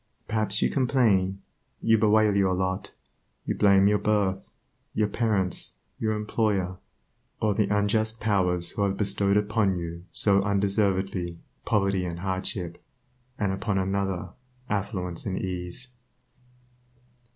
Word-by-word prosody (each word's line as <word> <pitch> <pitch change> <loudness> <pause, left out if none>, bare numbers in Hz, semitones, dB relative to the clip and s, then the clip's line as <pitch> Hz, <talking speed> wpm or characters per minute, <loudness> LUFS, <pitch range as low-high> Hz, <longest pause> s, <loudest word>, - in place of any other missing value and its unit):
Perhaps 110 -1 +1
you - - +2
complain, 105 -8 +2 0.4
you 115 - +3
bewail 110 -1 +4
your 95 -2 +3
lot; 95 +1 -2 0.5
you - - 0
blame 100 -1 +5
your 105 0 +3
birth, 100 -3 0 0.5
your 105 -1 +2
parents, 105 -4 -1 0.3
your 110 -1 0
employer, 105 -4 -1 0.6
or 105 -1 +2
the 105 0 +1
unjust 110 +2 +1
Powers 90 -5 +1
who - - -4
have 100 -1 +1
bestowed 100 0 +2
upon 105 -2 +1
you 85 0 -6
so 100 -1 +3
undeservedly 95 -3 0 0.3
poverty 100 -2 +1
and 85 -1 -5
hardship, 95 -2 -3 0.5
and 100 -2 0
upon 100 +1 -1
another 95 -1 -1 0.4
affluence 95 -4 -3
and 95 -1 -2
ease. 90 +7 -5
100 Hz, 120 wpm, -26 LUFS, 95-105 Hz, 0.6 s, blame